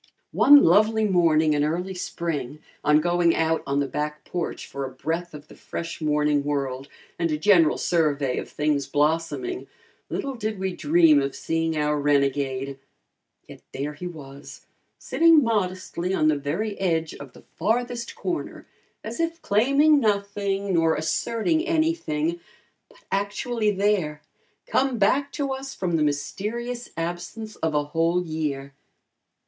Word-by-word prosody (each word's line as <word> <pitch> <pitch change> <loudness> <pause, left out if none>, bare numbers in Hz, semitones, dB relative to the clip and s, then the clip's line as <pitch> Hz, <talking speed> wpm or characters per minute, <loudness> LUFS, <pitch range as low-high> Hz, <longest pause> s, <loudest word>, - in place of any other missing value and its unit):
One 290 0 +7
lovely 215 +5 +4
morning, 160 -5 +3
in 145 - +1
the 150 - +2
early 180 +4 -2
spring, 165 -6 -4 0.3
on 150 +1 +4
going 175 0 +2
out 160 0 +1
on 140 +1 0
the 140 - 0
back 150 +2 -4
porch 175 -2 -4
for 140 - -6
a 135 - -4
breath 160 +6 -4
of 150 0 -11
the - - -14
fresh 170 0 -7
morning 150 -1 +1
world 135 -2 -2 0.3
and 170 -1 +1
a 155 - 0
general 165 -2 +4
survey 145 -6 +1
of - - -7
things 150 -2 0
blossoming, 165 - -1 0.4
little 275 -1 -3
did 215 -3 -3
we 190 -1 -3
dream 155 -1 +4
of 135 0 -3
seeing 165 -1 -1
our 150 0 +1
renegade. 140 -1 0 0.7
Yet - - -12
there 145 +3 -3
he 180 +4 -7
was, 140 -5 -11 0.3
sitting 330 -2 +4
modestly 185 -4 -1
on 155 - +3
the 155 - +3
very 170 +10 -3
edge 165 -4 0
of 140 -3 -11
the - - -16
farthest 240 +1 -1
corner, 355 -2 -4 0.4
as - - -6
if 330 0 -1
claiming 275 +8 +4
nothing, 200 -3 -1
nor 165 -1 +3
asserting 230 - 0
anything, 175 - 0 0.5
but - - -21
actually 210 +3 -1
there, 190 -7 0 0.4
come 265 -2 +1
back 275 +7 +2
to 280 -2 -2
us 265 0 -5
from 175 -3 -1
the 160 - +1
mysterious 225 +12 -3
absence 175 +6 -5
of 160 -2 -1
a 145 - +2
whole 165 +4 0
year. 145 -4 -3
170 Hz, 150 wpm, -24 LUFS, 150-210 Hz, 0.7 s, One